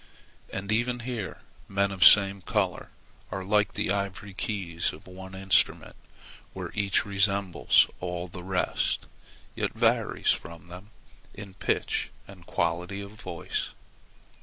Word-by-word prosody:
And 100 +2 -4
even 120 +2 +1
here 120 -5 -5 0.3
men 100 0 +1
of 95 - -6
the - - +11
same 100 -1 +6
color - - -1 0.4
are 95 - -4
like 105 +2 +2
the - - 0
ivory 100 0 -3
keys 95 -5 -2
of 75 - -13
one 95 +1 -10
instrument 95 0 +2 0.6
where - - -6
each 100 -2 +2
resembles 100 -2 +3
all 90 0 -4
the 90 +1 -9
rest, 90 0 0 0.5
yet - - -2
varies - - +2
from 85 +2 -5
them 90 +4 -10 0.5
in 100 -2 -9
pitch 100 - -1 0.2
and 90 -3 -14
quality 90 +4 -1
of 100 0 -7
voice. 90 -5 -4
95 Hz, 135 wpm, -28 LUFS, 90-100 Hz, 0.6 s, the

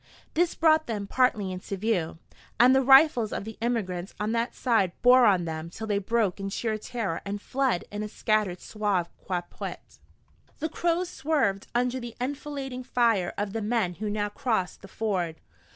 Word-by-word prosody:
This 345 +1 +1
brought 315 -1 +4
them 210 -3 -3
partly 210 -4 +1
into 185 +2 -5
view, 185 -6 -1 0.4
and 250 +2 +7
the 265 - +5
rifles 265 -4 +6
of - - -3
the 220 +1 -8
emigrants 195 -6 -2
on 210 +1 -1
that 230 +1 -1
side 220 -8 +2
bore 250 0 +7
on 185 -4 +3
them 160 0 -5
till 220 +6 -7
they 205 -2 0
broke 205 -2 0
in 195 0 -3
sheer 220 +2 -2
terror 220 -7 -3
and 200 +1 -4
fled 260 -4 0
in 205 0 -4
a 215 - -3
scattered 210 -4 0
sauve 205 -5 -1
qui 180 -2 -1
peut. - - -8 0.6
The 315 - -2
Crows 345 +3 0
swerved 280 - 0
under 250 +1 +1
the 240 -2 -8
enfilading 270 -1 -4
fire 230 -8 +2
of 205 -1 -2
the 225 - -2
men 210 -4 0
who 215 - -1
now 205 0 -1
crossed 220 -6 -2
the 195 - -11
ford. 185 -6 -2
220 Hz, 180 wpm, -27 LUFS, 195-250 Hz, 0.6 s, and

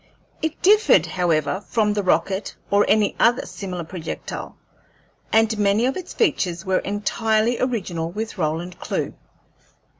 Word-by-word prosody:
It 315 0 -2
differed, 420 +3 +5
however, 175 0 0
from 215 -3 +2
the 205 - 0
rocket 190 +1 0 0.2
or 200 0 +5
any 210 -1 +3
other 240 +1 +3
similar 180 -4 -6
projectile, 165 0 -6 0.7
and 225 0 +3
many 205 +3 +3
of 265 - 0
its 365 -1 -6
features 180 - 0
were 190 -1 +2
entirely 220 +3 0
original 185 -10 -2
with 215 +5 -5
Roland 165 +3 -2
Clewe. - - -3
205 Hz, 130 wpm, -22 LUFS, 180-225 Hz, 0.7 s, differed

